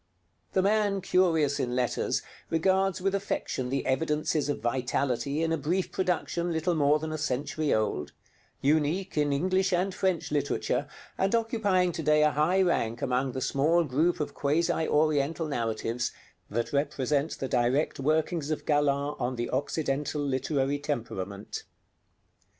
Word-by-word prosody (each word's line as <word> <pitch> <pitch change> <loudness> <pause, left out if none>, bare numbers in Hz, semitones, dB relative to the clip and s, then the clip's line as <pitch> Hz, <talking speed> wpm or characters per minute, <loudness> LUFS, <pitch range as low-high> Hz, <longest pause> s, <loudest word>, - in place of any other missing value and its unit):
The 190 - +3
man 205 -1 +2
curious 165 -7 +2
in 125 -2 -1
letters 125 -1 0 0.3
regards 190 +3 +1
with 195 0 +1
affection 195 -9 -2
the 135 0 -1
evidences 150 +2 0
of 145 - -1
vitality 130 +4 -1
in 165 - 0
a 165 - 0
brief 175 +6 -1
production 175 -1 -1
little 165 +2 0
more 150 -1 +3
than 155 +1 -5
a 155 - -3
century 145 +1 -1
old; 90 -9 0 0.5
unique 155 +7 +1
in 150 -1 +2
English 185 +6 +1
and 185 +2 +1
French 185 -5 -1
literature, 145 -1 0 0.3
and 195 +4 +2
occupying 205 -6 +1
to 165 - -4
day 150 0 +4
a 150 - +4
high 170 +7 +3
rank 120 -10 0
among 130 +1 0
the 130 - -3
small 160 +7 +2
group 155 +5 +1
of 150 - -3
quasi 160 +2 +1
Oriental 155 +1 +1
narratives 115 -2 -2 0.4
that 115 +5 -2
represent 140 +1 0
the 135 - -3
direct 125 +5 +1
workings 155 +2 0
of 155 - -2
Galland 145 -1 +1
on 125 0 -1
the 120 0 -3
Occidental 145 +1 -1
literary 140 +1 0
temperament. 105 -8 -4
150 Hz, 145 wpm, -28 LUFS, 135-170 Hz, 0.5 s, day